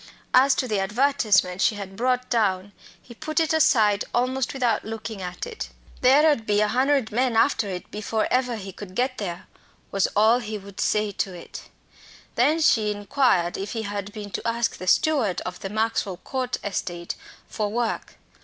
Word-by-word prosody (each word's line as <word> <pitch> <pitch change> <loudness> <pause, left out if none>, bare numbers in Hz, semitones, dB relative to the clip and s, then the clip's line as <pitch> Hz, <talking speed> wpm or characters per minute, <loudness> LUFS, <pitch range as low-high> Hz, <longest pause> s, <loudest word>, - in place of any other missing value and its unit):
As 265 +2 +6
to 255 - -1
the 210 -4 0
advertisement 210 -4 +2
she 215 - +3
had 195 -2 -7
brought 250 +2 0
down, 205 -4 0 0.3
he 240 - -14
put 310 +7 -2
it 320 -1 +1
aside 220 -9 +4
almost 255 +1 0
without 245 -5 0
looking 220 -2 -6
at 180 - -5
it. 470 -2 -6 0.3
"There 275 +5 +6
ud 260 -8 +1
be 205 0 +3
a 210 - +3
hun'erd 260 0 +2
men 245 +1 +1
after 225 -3 +2
it 180 -2 -6
before 215 +1 -1
ever 250 -1 +1
he 195 -3 -7
could 190 0 -10
get 255 +1 0
there," 175 -4 -5 0.5
was 195 -1 +2
all 220 +4 +5
he 215 -3 -5
would 200 -1 -12
say 210 -1 +1
to 190 -1 -3
it. 170 - -10 0.6
Then 295 +7 +2
she 220 -8 +3
inquired 205 -4 +1
if 195 +1 -4
he 225 -2 -3
had 205 -1 -4
been 205 -1 -8
to - - -3
ask 230 0 0
the 185 - -8
steward 230 - +2
of 180 0 -6
the 195 - -5
Maxwell 215 -3 -1
Court 255 +5 -3
estate 175 -3 -3 0.3
for 210 -2 -2
work. 235 0 -2
220 Hz, 180 wpm, -24 LUFS, 200-255 Hz, 0.6 s, As